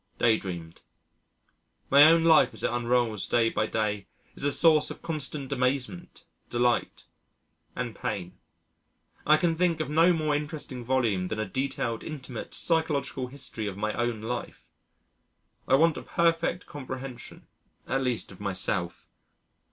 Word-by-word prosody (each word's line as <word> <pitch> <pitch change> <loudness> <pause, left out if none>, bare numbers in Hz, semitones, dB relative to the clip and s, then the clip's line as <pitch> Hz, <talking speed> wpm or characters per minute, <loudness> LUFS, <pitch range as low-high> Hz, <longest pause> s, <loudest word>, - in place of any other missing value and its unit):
Day 115 -2 +4
dreamed. 85 -3 -7 1.1
My 140 +2 +9
own 165 +1 +6
life 160 -2 +5
as - - -8
it - - +1
unrolls 120 -3 0
day 115 -1 +2
by 110 - 0
day 105 -3 -2 0.3
is - - -8
a 145 - +2
source 155 0 +4
of - - -9
constant 150 -3 -4
amazement, 135 +6 -2 0.2
delight, 120 0 0 0.7
and 125 -3 -3
pain. 90 -2 -5 0.9
I 155 +1 +7
can 165 +1 +1
think 170 -1 +1
of 155 - -3
no 165 +3 +5
more 155 -3 0
interesting 145 -4 -5
volume 115 -7 +1
than 110 - -4
a 110 - 0
detailed, 125 -3 -2
intimate, 130 -6 -7
psychological 155 -5 0
history 125 -5 -5
of 100 -1 -5
my 105 +1 -1
own 120 -2 -1
life. 120 +2 -6 1.0
I 135 - +5
want 160 +2 +4
a - - -5
perfect 170 +1 0
comprehension 130 -3 -8 0.4
at 135 +1 0
least 125 -5 -2
of 95 - -13
myself.... 95 -2 -2
130 Hz, 145 wpm, -27 LUFS, 110-155 Hz, 1.1 s, My